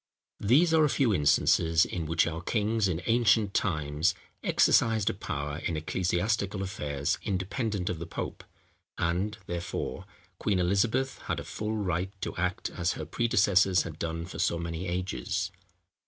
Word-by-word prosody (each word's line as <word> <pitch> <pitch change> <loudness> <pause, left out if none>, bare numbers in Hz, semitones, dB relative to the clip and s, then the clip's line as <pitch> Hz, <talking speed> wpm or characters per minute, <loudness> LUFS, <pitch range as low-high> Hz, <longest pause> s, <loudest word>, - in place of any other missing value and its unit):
These 150 - +4
are 160 -1 +5
a 150 - +4
few 130 -5 +2
instances 80 +1 +4
in 85 -4 -4
which 80 +2 +3
our 85 0 -3
kings 110 +2 +1
in 85 -2 -2
ancient 115 -3 +3
times 75 - +1 0.3
exercised 110 -3 +3
a - - -7
power 75 -6 -4
in 80 - -2
ecclesiastical 95 +5 -1
affairs 70 -7 -2
independent 100 +1 -2
of 90 -3 -2
the 85 - -6
pope; - - -5 0.5
and, 95 +6 -1
therefore, 85 +2 -4 0.3
Queen 105 -3 +1
Elizabeth 110 +9 +1
had - - -1
a - - -5
full 110 +1 -4
right 95 -2 -1
to - - -4
act 90 +1 -2
as 85 -1 -1
her 80 - -6
predecessors 95 -2 +3
had 80 -2 -8
done 85 0 -3
for 90 - -8
so 85 - +1
many 85 +2 -4
ages. 90 - -2
90 Hz, 155 wpm, -29 LUFS, 85-105 Hz, 0.5 s, are